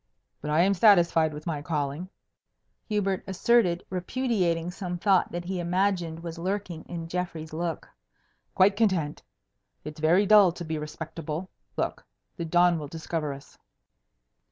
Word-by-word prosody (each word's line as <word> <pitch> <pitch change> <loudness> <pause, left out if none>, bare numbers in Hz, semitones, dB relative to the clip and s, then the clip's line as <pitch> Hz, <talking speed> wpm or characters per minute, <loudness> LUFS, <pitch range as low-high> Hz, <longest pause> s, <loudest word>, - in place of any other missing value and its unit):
"But 150 - -5
I 155 +2 +3
am 195 +3 +4
satisfied 175 -6 +5
with 150 0 -9
my 155 -4 -2
calling," 150 +3 -3 0.8
Hubert 195 -3 0
asserted, 190 -2 +2
repudiating 180 -4 0
some 180 -2 -5
thought 190 0 +3
that 175 0 -4
he 185 0 -3
imagined 175 -2 0
was 165 0 -7
lurking 185 -2 -3
in 170 -2 -6
Geoffrey's 165 -3 -4
look. 165 0 -3 0.7
"Quite 195 +2 +5
content! 185 -9 +1 0.6
It's 150 +1 -8
very 170 +6 +4
dull 200 -4 +6
to 175 -1 -7
be 160 -1 -3
respectable. 160 +2 -6 0.3
Look! - - -2 0.3
the 170 - -4
dawn 175 0 +3
will 150 - -6
discover 160 -1 -3
us." 140 0 -11
175 Hz, 140 wpm, -27 LUFS, 160-190 Hz, 0.8 s, dull